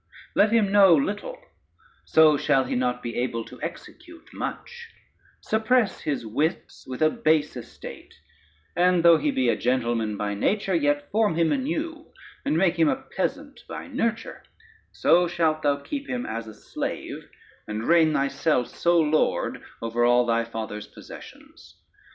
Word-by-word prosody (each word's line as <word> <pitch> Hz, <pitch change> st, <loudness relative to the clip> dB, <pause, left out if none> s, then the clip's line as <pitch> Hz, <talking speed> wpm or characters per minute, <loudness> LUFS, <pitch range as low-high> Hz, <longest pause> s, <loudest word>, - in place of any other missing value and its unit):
] -, -, -22 dB
Let 210 Hz, +1 st, +4 dB
him 220 Hz, -4 st, +3 dB
know 195 Hz, -4 st, +7 dB
little, 205 Hz, -, -2 dB, 0.7 s
so 155 Hz, -1 st, +5 dB
shall 135 Hz, -1 st, +2 dB
he 125 Hz, -, -4 dB
not 125 Hz, 0 st, -1 dB
be 120 Hz, -1 st, -5 dB
able 115 Hz, -2 st, -2 dB
to -, -, -13 dB
execute 335 Hz, -3 st, -9 dB
much: 475 Hz, -1 st, -6 dB, 0.5 s
suppress 220 Hz, -1 st, +1 dB
his 145 Hz, -6 st, -3 dB
wits 155 Hz, -, -3 dB
with 130 Hz, +3 st, -3 dB
a 155 Hz, -, +4 dB
base 155 Hz, -, +1 dB
estate, 120 Hz, -2 st, -10 dB, 0.6 s
and 180 Hz, 0 st, +3 dB
though 165 Hz, -2 st, +7 dB
he 150 Hz, 0 st, 0 dB
be 130 Hz, -3 st, 0 dB
a 115 Hz, -, +3 dB
gentleman 115 Hz, -2 st, -1 dB
by 105 Hz, 0 st, -2 dB
nature, 195 Hz, -, 0 dB
yet 145 Hz, -3 st, 0 dB
form 210 Hz, -5 st, +2 dB
him 165 Hz, -1 st, +2 dB
anew, 310 Hz, +4 st, -3 dB, 0.3 s
and 155 Hz, -, 0 dB
make 175 Hz, -1 st, +2 dB
him 160 Hz, -2 st, +5 dB
a -, -, +2 dB, 0.2 s
peasant -, -, -3 dB
by -, -, -6 dB
nurture: 230 Hz, 0 st, -3 dB, 0.5 s
so 175 Hz, +1 st, +3 dB
shalt 160 Hz, -2 st, 0 dB
thou 145 Hz, -1 st, +2 dB
keep 280 Hz, -, -6 dB
him 250 Hz, 0 st, -3 dB
as 115 Hz, 0 st, -5 dB
a 110 Hz, -, -10 dB
slave, -, -, -6 dB, 0.4 s
and 105 Hz, +1 st, -4 dB
reign 165 Hz, -2 st, +5 dB
thyself 140 Hz, -2 st, 0 dB
sole 170 Hz, -2 st, +2 dB
lord 155 Hz, +1 st, 0 dB, 0.2 s
over 115 Hz, +1 st, 0 dB
all 120 Hz, 0 st, +4 dB
thy 115 Hz, 0 st, +1 dB
father's 110 Hz, -2 st, -6 dB
possessions. -, -, -14 dB
155 Hz, 155 wpm, -25 LUFS, 125-200 Hz, 0.7 s, know